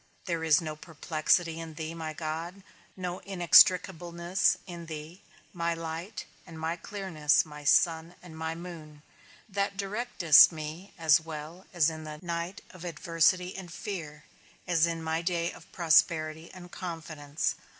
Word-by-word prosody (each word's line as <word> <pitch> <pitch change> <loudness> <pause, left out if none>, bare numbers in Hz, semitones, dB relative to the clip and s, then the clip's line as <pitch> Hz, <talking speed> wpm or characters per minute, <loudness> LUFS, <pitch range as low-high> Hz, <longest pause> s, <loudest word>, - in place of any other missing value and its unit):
There 170 -3 -2
is 160 +2 +4
no 155 -2 -5
perplexity 160 +1 0
in 165 -1 -8
thee, 160 0 -5
my 160 -1 -5
God; 165 +5 -5 0.3
no 180 -1 -4
inextricableness 175 -1 +4
in 170 -3 -8
thee, 160 +3 -8 0.3
my 170 -1 -1
light 165 +5 -6 0.2
and 165 -2 -10
my 160 +1 -1
clearness, 170 -6 +1
my 150 -1 -11
sun 165 +3 +3
and 170 -3 -11
my 160 0 -3
moon, 160 -4 -10 0.4
that 200 -1 -2
directest 200 -6 +5
me 160 +4 -7
as 160 -3 +5
well 160 +3 -8
in 160 -2 +1
the 155 0 -7
night 170 +2 -4
of 180 -2 -12
adversity 175 +2 +1
and 185 -3 -8
fear, 165 -7 -6 0.4
as 170 -2 +3
in 165 -1 -3
my 160 +1 -1
day 170 -1 -1
of 170 - -15
prosperity 160 -1 +2
and 180 -1 -12
confidence. 155 -4 -3
165 Hz, 140 wpm, -29 LUFS, 160-180 Hz, 0.4 s, directest